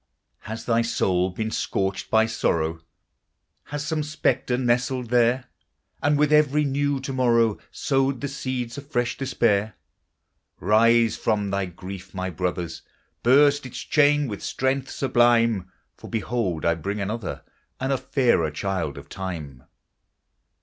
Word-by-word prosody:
Has 110 +1 -7
thy 115 -1 +2
soul 95 -5 +1
been 110 +4 -4
scorched 95 -2 -2
by 110 0 +4
sorrow, 80 -7 -1 0.8
Has 145 0 -5
some 155 0 -1
spectre 150 -4 0
nestled 125 0 0
there? 125 +1 +3 0.6
And 145 0 +2
with 150 +1 +3
every 150 0 +4
new 140 0 0
to 135 0 -4
morrow, 115 -4 +3
Sowed 135 -3 0
the 140 - -3
seeds 130 -3 -4
of 140 0 -13
fresh 120 -4 0
despair? 110 -5 +1 0.8
Rise 115 +1 +4
from 105 -3 0
thy 100 -1 -1
grief, 95 +2 -9
my 95 0 -3
brothers! 85 -2 -3 0.4
Burst 145 +3 +5
its 130 - -9
chain 145 -1 +3
with 105 -4 -6
strength 130 0 -1
sublime, 115 -6 +2 0.3
For - - -11
behold! 110 -7 -2
I 85 - +4
bring 100 +6 -4
another, 105 +1 -4 0.4
And 130 +1 0
a - - +1
fairer 120 - +2
child 85 -2 -3
of - - -10
time. 80 -9 -6
115 Hz, 135 wpm, -24 LUFS, 95-135 Hz, 0.8 s, Burst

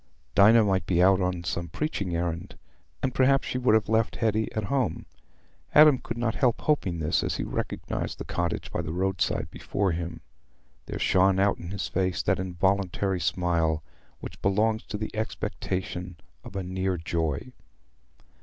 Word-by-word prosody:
Dinah 110 +3 +7
might 95 -2 +1
be 85 -2 +2
out 95 +1 +5
on 90 -1 -1
some 85 +2 -3
preaching 100 - -2
errand, 85 0 -3 0.5
and 130 - 0
perhaps 135 +1 +3
she 125 - -2
would 125 -4 +4
have 110 - +2
left 110 0 +1
Hetty 110 -1 0
at 110 - -2
home. 130 +3 -1 0.7
Adam 150 -3 +8
could 115 - -6
not 120 -2 0
help 125 -4 +1
hoping 100 - +1
this, 80 0 +1
and - - -1
as - - -2
he - - -2
recognized - - -3
the - - -6
cottage 85 -1 -2
by - - -1
the 80 -2 -5
roadside 95 +2 -1
before 100 -2 -1
him, 85 0 -4 0.7
there - - -4
shone 95 +1 +3
out 100 0 +2
in 85 - -7
his 100 0 -3
face 90 -3 -1
that - - +1
involuntary 95 +1 0
smile 80 -2 0 0.4
which - - -9
belongs 110 +3 +2
to 105 - -5
the 110 +1 -5
expectation 90 -4 -3 0.3
of - - -11
a 95 - -2
near 95 0 -1
joy. 80 - -2
95 Hz, 170 wpm, -27 LUFS, 85-110 Hz, 0.7 s, Adam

